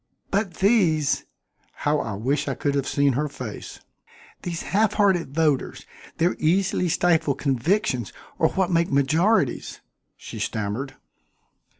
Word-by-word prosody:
"But 195 Hz, -3 st, 0 dB
these 180 Hz, -, +2 dB, 0.2 s
" -, -, -41 dB
How 150 Hz, 0 st, +2 dB
I 110 Hz, -, -3 dB
wish 130 Hz, +8 st, -1 dB
I -, -, -1 dB
could 145 Hz, -, -1 dB
have 140 Hz, -1 st, -1 dB
seen 140 Hz, -1 st, +2 dB
her 150 Hz, +4 st, 0 dB
face! 125 Hz, -7 st, -8 dB, 0.6 s
"These 170 Hz, -2 st, -4 dB
half 210 Hz, +1 st, +1 dB
hearted 180 Hz, -9 st, +1 dB
voters, 155 Hz, -4 st, 0 dB, 0.3 s
their 175 Hz, +2 st, +2 dB
easily 180 Hz, +2 st, +1 dB
stifled 160 Hz, -4 st, +2 dB
convictions 135 Hz, -, 0 dB, 0.3 s
are -, -, +4 dB
what 190 Hz, -1 st, 0 dB
make 170 Hz, 0 st, +1 dB
majorities," 150 Hz, -, +1 dB, 0.4 s
she -, -, -9 dB
stammered. 110 Hz, +6 st, -3 dB
155 Hz, 130 wpm, -24 LUFS, 135-180 Hz, 0.6 s, are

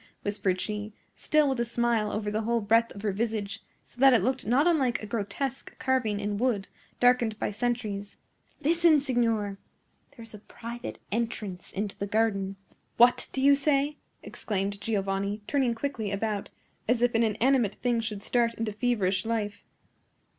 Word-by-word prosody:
whispered 200 Hz, -3 st, 0 dB
she, 210 Hz, +1 st, -4 dB, 0.2 s
still 305 Hz, -1 st, +2 dB
with 265 Hz, -3 st, 0 dB
a -, -, +3 dB
smile 235 Hz, -2 st, 0 dB
over 210 Hz, -1 st, -2 dB
the 215 Hz, +1 st, -1 dB
whole 235 Hz, +1 st, +1 dB
breadth 225 Hz, +2 st, +3 dB
of 200 Hz, -, -9 dB
her 210 Hz, -, +1 dB
visage, 215 Hz, 0 st, -2 dB, 0.2 s
so 250 Hz, -, -13 dB
that 270 Hz, -1 st, +8 dB
it 235 Hz, -, +4 dB
looked 260 Hz, -3 st, -1 dB
not 260 Hz, +6 st, +4 dB
unlike 280 Hz, -9 st, +2 dB
a -, -, -7 dB
grotesque 235 Hz, +5 st, -4 dB
carving 255 Hz, -6 st, 0 dB
in 205 Hz, 0 st, -2 dB
wood, 225 Hz, -6 st, 0 dB, 0.3 s
darkened 245 Hz, -3 st, +3 dB
by -, -, -2 dB
centuries. 210 Hz, -3 st, -3 dB, 0.4 s
"Listen, 330 Hz, 0 st, +4 dB
signor! 230 Hz, -7 st, 0 dB, 0.6 s
There 230 Hz, -, -9 dB
is 225 Hz, -, -10 dB
a 210 Hz, -, -9 dB
private 235 Hz, +3 st, -8 dB
entrance 210 Hz, -5 st, -3 dB
into 200 Hz, 0 st, -3 dB
the 200 Hz, -, -4 dB
garden!" 200 Hz, -2 st, 0 dB, 0.4 s
"What 240 Hz, +1 st, +5 dB
do 265 Hz, -, -2 dB
you 280 Hz, +1 st, +7 dB
say?" 285 Hz, +1 st, +1 dB, 0.3 s
exclaimed 200 Hz, -1 st, -3 dB
Giovanni, 200 Hz, -1 st, -1 dB
turning 260 Hz, -3 st, +1 dB
quickly 225 Hz, -5 st, -3 dB
about, 205 Hz, 0 st, -2 dB, 0.4 s
as 240 Hz, +1 st, +2 dB
if 245 Hz, -, +3 dB
an 225 Hz, -, +3 dB
inanimate 230 Hz, 0 st, +2 dB
thing 240 Hz, -2 st, 0 dB
should 210 Hz, -3 st, -4 dB
start 235 Hz, -1 st, +1 dB
into 225 Hz, -2 st, -3 dB
feverish 205 Hz, -5 st, +1 dB
life. 215 Hz, -3 st, -2 dB
225 Hz, 165 wpm, -28 LUFS, 205-245 Hz, 0.6 s, that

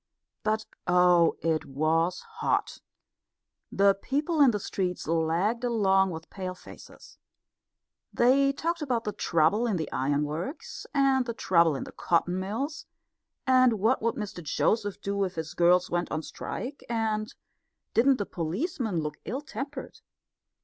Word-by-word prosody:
But 215 Hz, 0 st, 0 dB, 0.2 s
oh, 175 Hz, -1 st, +5 dB
it 160 Hz, -1 st, +1 dB
was 160 Hz, +5 st, 0 dB
hot! -, -, -2 dB, 0.9 s
The 200 Hz, 0 st, +4 dB
people 290 Hz, -, -1 dB
in 275 Hz, -, +8 dB
the 210 Hz, -3 st, 0 dB
streets 185 Hz, -2 st, -3 dB
lagged 165 Hz, +9 st, +1 dB
along 195 Hz, -5 st, +3 dB
with 160 Hz, -2 st, -8 dB
pale 185 Hz, -2 st, -5 dB
faces. -, -, -14 dB, 0.9 s
They 275 Hz, +3 st, +4 dB
talked 335 Hz, +4 st, -2 dB
about 250 Hz, -6 st, -1 dB
the 210 Hz, -, -2 dB
trouble 180 Hz, +7 st, +2 dB
in 210 Hz, -5 st, 0 dB
the 160 Hz, -, -4 dB
ironworks, 150 Hz, -, -3 dB
and 270 Hz, -3 st, +2 dB
the 235 Hz, -, -3 dB
trouble 170 Hz, -7 st, +3 dB
in -, -, -4 dB
the -, -, -9 dB
cotton 175 Hz, +2 st, 0 dB
mills, 230 Hz, +11 st, -4 dB, 0.6 s
and 255 Hz, -2 st, +5 dB
what 220 Hz, +5 st, +1 dB
would 230 Hz, +1 st, 0 dB
Mr 205 Hz, -4 st, -5 dB
Joseph 205 Hz, +5 st, 0 dB
do 200 Hz, 0 st, -1 dB
if 185 Hz, -1 st, -3 dB
his 160 Hz, -1 st, -5 dB
girls 180 Hz, +1 st, +3 dB
went 175 Hz, 0 st, -1 dB
on 155 Hz, +1 st, -2 dB
strike, 270 Hz, -, -6 dB
and 220 Hz, 0 st, -1 dB, 0.6 s
didn't 260 Hz, +3 st, +4 dB
the 205 Hz, -, -2 dB
policemen 195 Hz, -, -2 dB
look 150 Hz, -1 st, -4 dB
ill 250 Hz, -, -3 dB
tempered? 280 Hz, -1 st, -7 dB
200 Hz, 140 wpm, -28 LUFS, 170-245 Hz, 0.9 s, in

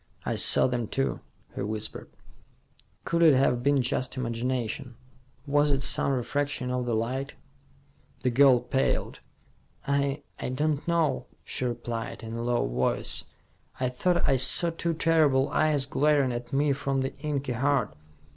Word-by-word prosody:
"I -, -, -1 dB
saw -, -, +6 dB
them, 125 Hz, -3 st, -1 dB
too," 65 Hz, -8 st, -1 dB, 0.3 s
he -, -, -5 dB
whispered. 110 Hz, +1 st, -5 dB, 1.0 s
"Could 170 Hz, 0 st, 0 dB
it 160 Hz, -4 st, +7 dB
have 125 Hz, -2 st, +2 dB
been 140 Hz, 0 st, +2 dB
just 130 Hz, +2 st, -1 dB
imagination? 120 Hz, 0 st, -3 dB, 0.5 s
Was 145 Hz, +1 st, +2 dB
it 140 Hz, -1 st, +1 dB
some 140 Hz, -, +2 dB
refraction 135 Hz, 0 st, -2 dB
of 125 Hz, -1 st, -2 dB
the 120 Hz, -, 0 dB
light?" 130 Hz, +5 st, -3 dB, 0.9 s
The 125 Hz, -, +2 dB
girl 130 Hz, -1 st, +5 dB
paled. 130 Hz, +2 st, -1 dB, 0.7 s
"I 140 Hz, +1 st, 0 dB, 0.2 s
I -, -, -3 dB
don't 145 Hz, +3 st, -1 dB
know," 170 Hz, -3 st, 0 dB, 0.2 s
she 130 Hz, -, -4 dB
replied, 120 Hz, 0 st, -4 dB
in 115 Hz, 0 st, -6 dB
a 115 Hz, -, -4 dB
low 120 Hz, 0 st, 0 dB
voice. -, -, -2 dB, 0.5 s
"I 130 Hz, -1 st, 0 dB
thought 175 Hz, +8 st, 0 dB
I 135 Hz, -, +3 dB
saw 135 Hz, +6 st, +3 dB
two 165 Hz, 0 st, -2 dB
terrible 155 Hz, -5 st, +3 dB
eyes 150 Hz, -3 st, +1 dB
glaring 140 Hz, -1 st, +2 dB
at 120 Hz, +2 st, -6 dB
me 140 Hz, +1 st, +2 dB
from 135 Hz, 0 st, -1 dB
the 135 Hz, -, -3 dB
inky 140 Hz, -3 st, -2 dB
heart. 125 Hz, -, 0 dB
135 Hz, 150 wpm, -27 LUFS, 120-145 Hz, 1.0 s, it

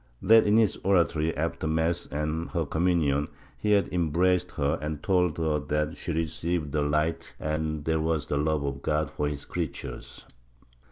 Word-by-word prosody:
That 110 Hz, +2 st, +6 dB
in 105 Hz, +2 st, +4 dB
his 110 Hz, -4 st, +3 dB
oratory 85 Hz, -4 st, +1 dB
after 80 Hz, 0 st, -2 dB
mass 80 Hz, +2 st, 0 dB
and 75 Hz, +3 st, -3 dB
her 85 Hz, -3 st, 0 dB
communion 80 Hz, -3 st, +1 dB, 0.3 s
he 105 Hz, 0 st, +2 dB
had 100 Hz, -1 st, +3 dB
embraced 90 Hz, +2 st, +2 dB
her 75 Hz, +1 st, 0 dB
and 75 Hz, -1 st, -4 dB
told 90 Hz, -4 st, +2 dB
her 80 Hz, -2 st, +1 dB
that 75 Hz, +2 st, -1 dB
she -, -, -5 dB
received 80 Hz, -1 st, -2 dB
the 75 Hz, +1 st, 0 dB
light 75 Hz, +3 st, -1 dB
and 75 Hz, -1 st, -2 dB
that 80 Hz, -, +1 dB
this 80 Hz, -, +2 dB
was 80 Hz, -1 st, 0 dB
the 70 Hz, -, -1 dB
love 75 Hz, 0 st, +1 dB
of 70 Hz, -1 st, -3 dB
God 75 Hz, +1 st, 0 dB
for 75 Hz, -, -1 dB
his 75 Hz, -1 st, -4 dB
creatures 80 Hz, -6 st, -6 dB
80 Hz, 175 wpm, -27 LUFS, 75-85 Hz, 0.3 s, That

